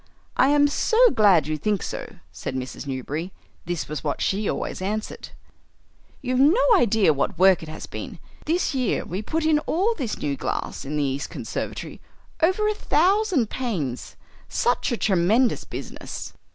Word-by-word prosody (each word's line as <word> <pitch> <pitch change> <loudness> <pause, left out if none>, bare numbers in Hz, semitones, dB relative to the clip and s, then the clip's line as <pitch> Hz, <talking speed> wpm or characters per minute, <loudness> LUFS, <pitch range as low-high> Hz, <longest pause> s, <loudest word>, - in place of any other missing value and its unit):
"I 260 - +4
am 290 0 +5
so 445 +9 0
glad 200 -7 +5
you 155 0 -2
think 205 +2 0
so," - - -6 0.2
said 130 - -6
Mrs. 130 +2 -5
Newberry 145 +7 -4 0.4
(this 175 -2 -2
was 150 -3 -5
what - - -2
she 200 +1 0
always - - -3
answered); 215 +3 -4 0.9
"you've 255 0 0
no 295 - +5 0.2
idea 220 - +4
what 140 +4 -1
work 190 0 +5
it 160 - -8
has 155 - -7
been. - - -7 0.3
This 335 0 +1
year 255 -3 0
we 185 +4 -4
put 315 +9 -2
in 310 -1 +4
all 390 +8 +2
this 265 - -4
new 140 -1 -2
glass 135 - -4
in 150 +2 -3
the 145 - +1
east 140 0 -2
conservatory, - - -5 0.4
over 375 +6 +3
a 425 - +2
thousand 370 - +2
panes. 170 - -3 0.3
Such - - +1
a 240 - 0
tremendous 215 +7 +2
business!" - - -7
215 Hz, 165 wpm, -24 LUFS, -, 0.9 s, am